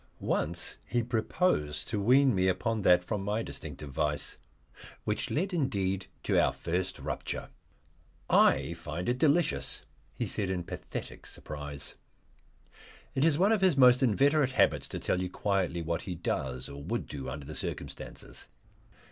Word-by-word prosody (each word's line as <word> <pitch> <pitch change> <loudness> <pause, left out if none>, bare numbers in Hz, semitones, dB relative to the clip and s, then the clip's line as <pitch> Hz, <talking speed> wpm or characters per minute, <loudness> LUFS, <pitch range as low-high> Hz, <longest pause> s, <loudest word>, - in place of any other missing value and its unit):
Once 85 +3 -1
he 120 -1 +1
proposed 110 - 0
to 105 -3 -1
wean 130 +4 +5
me 95 -1 +2
upon 110 +4 0
that 90 -2 +5
from 105 +2 -2
my 105 +3 -1
distinctive 75 -8 -7
vice, 75 +1 -1 0.7
which - - -1
led 185 +5 -1
indeed 100 - 0 0.2
to - - +3
our - - +3
first 90 +2 -2
rupture. - - -4 0.8
"I 70 +5 +4
find 85 +1 -5
it 125 +1 +1
delicious," 160 +3 +2 0.3
he - - -1
said 100 -3 -2
in 90 -2 -1
pathetic - - -7
surprise. 75 -2 -6 1.2
It 135 - +1
is 155 -2 +4
one 195 +5 +4
of 220 -3 +3
his 185 -7 +4
most 125 -1 +7
inveterate 135 +3 +3
habits - - +3
to - - -5
tell 90 - 0
you 90 - -2
quietly 90 -3 0
what 85 +1 -1
he 90 - -5
does, 65 -6 -2
or 70 0 -8
would - - -2
do 70 -3 -6
under 70 +2 -6
the 75 - -7
circumstances. - - -6
95 Hz, 155 wpm, -30 LUFS, 80-130 Hz, 1.2 s, most